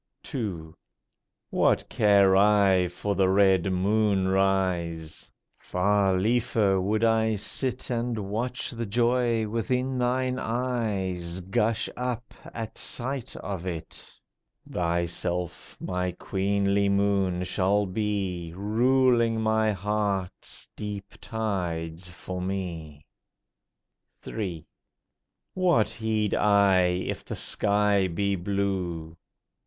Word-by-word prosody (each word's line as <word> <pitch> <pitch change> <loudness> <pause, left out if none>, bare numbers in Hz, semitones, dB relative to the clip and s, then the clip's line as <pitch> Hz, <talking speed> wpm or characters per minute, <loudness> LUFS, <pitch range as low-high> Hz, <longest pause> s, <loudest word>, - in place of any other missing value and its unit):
II. 90 - -4 0.8
What - - +2
care 100 -2 +4
I 100 -2 +4
for 95 +4 -3
the 95 -1 +2
red 95 -1 +4
moon 100 +1 +2
rise? 90 -4 0 0.3
Far 95 0 +1
liefer 110 -2 +2
would 105 +4 0
I 110 -1 +3
sit 125 +5 -2
And 120 -1 -1
watch 110 +5 -3
the 115 -2 -4
joy 120 0 +2
within 125 +4 -1
thine 125 +1 0
eyes 100 -8 -2
Gush 105 +5 0
up 125 -1 -4 0.2
at 115 -2 -6
sight 130 0 -3
of 95 -2 -5
it; 85 -3 -6 0.6
Thyself 85 0 -2
my 90 -1 -2
queenly 100 +2 0
moon 100 -2 +1
shall 95 +3 +1
be, 95 -4 -2
Ruling 115 +2 +3
my 110 0 +2
heart's 100 -1 -3
deep 105 -1 -6
tides 90 -6 -3
for 90 +1 -6
me! 85 -6 -5 1.2
III. 90 -8 -4 0.9
What 170 - +3
heed 110 -2 -1
I 100 -2 +4
if 90 +1 -2
the - - -6
sky 100 -2 +1
be 100 +3 0
blue? 90 -4 -2
100 Hz, 100 wpm, -27 LUFS, 90-110 Hz, 1.2 s, care